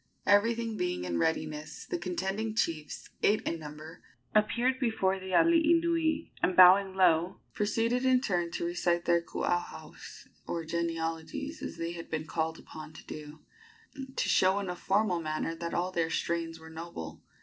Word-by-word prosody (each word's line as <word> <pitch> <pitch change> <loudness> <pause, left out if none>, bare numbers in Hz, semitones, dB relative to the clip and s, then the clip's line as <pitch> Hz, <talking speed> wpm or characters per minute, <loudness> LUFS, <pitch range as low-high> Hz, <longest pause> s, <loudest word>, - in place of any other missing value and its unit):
Everything 225 +2 +3
being 180 - -1
in 85 -1 -2
readiness, 155 - -2
the - - -3
contending 190 +5 -2
chiefs, 155 -8 -2
eight 210 +1 +4
in 165 - -2
number, 155 +2 -10 0.3
appeared 240 +5 +2
before 195 -6 +1
the 190 0 -8
alii 330 - +5
nui, 325 -2 0
and, 185 - +1
bowing 190 +1 +8
low, 175 -2 +3
proceeded 230 +4 0
in 260 -1 +4
turn 175 -9 -1
to 170 - -3
recite 175 0 0
their 170 0 +3
kuauhaus, 175 +1 -4 0.2
or 165 -1 -3
genealogies, 165 - -3
as - - -6
they 165 0 -3
had 170 -1 -8
been 155 -1 -3
called 160 0 -2
upon 155 0 -10
to - - -13
do, 150 0 -9 0.7
to - - 0
show 190 +1 +4
in 200 -2 -2
a - - -5
formal 190 -1 +1
manner 155 +1 -2
that 170 0 -5
all 180 +2 0
their 170 -2 0
strains 165 0 -2
were 160 0 -12
noble. 160 - -8
175 Hz, 160 wpm, -30 LUFS, 165-210 Hz, 0.7 s, bowing